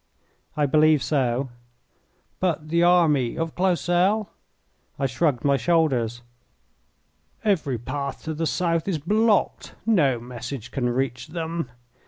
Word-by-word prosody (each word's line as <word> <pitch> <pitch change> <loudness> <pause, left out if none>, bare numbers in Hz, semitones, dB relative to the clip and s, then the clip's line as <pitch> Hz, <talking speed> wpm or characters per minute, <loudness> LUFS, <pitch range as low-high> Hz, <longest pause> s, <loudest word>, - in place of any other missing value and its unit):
"I 150 - +3
believe 155 0 +4
so." 130 -2 0 0.9
"But 160 -4 -1
the 170 +1 +2
army 165 -8 +3
of 165 -1 -2
Clausel?" 185 +3 +1 0.7
I 140 - -1
shrugged 130 +1 0
my 140 -1 +4
shoulders. 125 -6 +1 1.2
"Every 160 - +1
path 140 +4 -5
to 160 - -3
the 160 +1 -2
south 165 -1 0
is 185 -5 0
blocked. 210 +7 +1
No 150 - +3
message 120 0 -7
can 125 -3 -1
reach 125 0 -2
them. 165 -3 -4
155 Hz, 120 wpm, -24 LUFS, 130-170 Hz, 1.2 s, believe